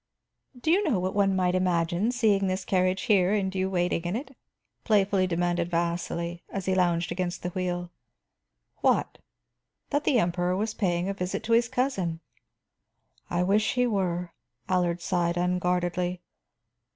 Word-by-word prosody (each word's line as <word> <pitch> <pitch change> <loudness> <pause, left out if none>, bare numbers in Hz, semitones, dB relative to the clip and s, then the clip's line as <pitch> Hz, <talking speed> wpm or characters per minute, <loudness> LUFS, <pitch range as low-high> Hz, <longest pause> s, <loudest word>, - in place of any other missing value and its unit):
"Do 315 - +1
you 390 +4 +4
know 275 - +1
what 185 +1 -2
one 195 -1 +2
might 180 -1 +1
imagine, 180 +3 +1
seeing 210 -5 +2
this 185 +1 -2
carriage 185 0 +1
here 200 -3 +3
and 190 -2 -1
you 190 0 0
waiting 175 -2 0
in 175 +4 -1
it?" 270 +2 -6 0.5
playfully 195 -3 +2
demanded 175 0 0
Vasili, 170 0 -2
as 195 -2 -4
he 190 - +1
lounged 175 -2 +1
against 175 0 -3
the 175 - -1
wheel. 175 -1 -3 0.9
"What?" - - +1 0.7
"That 290 +1 +1
the 255 - +3
Emperor 175 -2 +1
was 215 +2 -1
paying 175 -3 0
a 200 - -1
visit 195 +1 -3
to 230 - 0
his 235 +1 +3
cousin." 245 -11 -1 1.1
"I 175 +1 +1
wish 210 +5 +2
he 250 0 +3
were," 180 -6 -1 0.3
Allard 180 -2 +1
sighed 175 -1 0
unguardedly. 180 0 0
185 Hz, 150 wpm, -27 LUFS, 175-200 Hz, 1.1 s, you